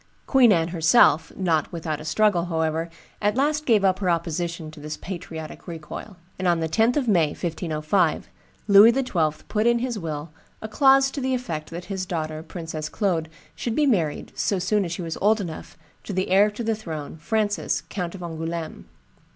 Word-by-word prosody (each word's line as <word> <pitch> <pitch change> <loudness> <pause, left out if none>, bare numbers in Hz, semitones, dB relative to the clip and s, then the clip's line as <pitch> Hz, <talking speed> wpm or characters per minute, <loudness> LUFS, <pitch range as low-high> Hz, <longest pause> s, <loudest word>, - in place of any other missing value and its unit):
Queen 255 -5 +5
Anne 165 -3 +2
herself, 160 -1 +4
not 170 -5 0
without 155 -3 -4
a - - -9
struggle, 200 -1 +2
however, 160 -1 -1 0.3
at 210 +1 +1
last 300 +3 0
gave 215 -5 +4
up 190 -1 +2
her 190 -3 0
opposition 170 -1 -2
to 155 - -13
this 150 +1 -6
patriotic 165 -4 -8
recoil; 170 +4 -8 0.2
and 185 - 0
on 170 -1 +3
the 160 - -1
10th 225 - +2
of 270 -4 0
May, 170 -8 +3
1505, 160 0 -1 0.4
Louis 205 +3 +8
XII. 175 - -1
put 215 +1 +1
in 235 0 +4
his 240 -2 -2
will 155 -2 -5 0.3
a 220 - -6
clause 270 +3 +4
to 280 - -4
the 260 0 0
effect 165 -12 -4
that 175 +2 -7
his 190 -1 -4
daughter, 155 -3 -3
Princess 160 -2 -6
Claude, 170 -6 -1 0.3
should 235 -2 -3
be 300 - +3
married, 170 - 0
so 200 - 0
soon 195 +2 +1
as 170 - -5
she 175 +1 -4
was 165 -1 -5
old 215 +3 +4
enough, 170 -5 -7 0.3
to 205 - -6
the 185 +1 -1
heir 200 +3 +5
to 210 +3 -6
the 225 0 +1
throne, 160 -8 -6
Francis, 205 +6 -1
Count 180 -2 -4
of 180 - -8
Angouleme. 165 0 -5
175 Hz, 190 wpm, -24 LUFS, 160-215 Hz, 0.4 s, Louis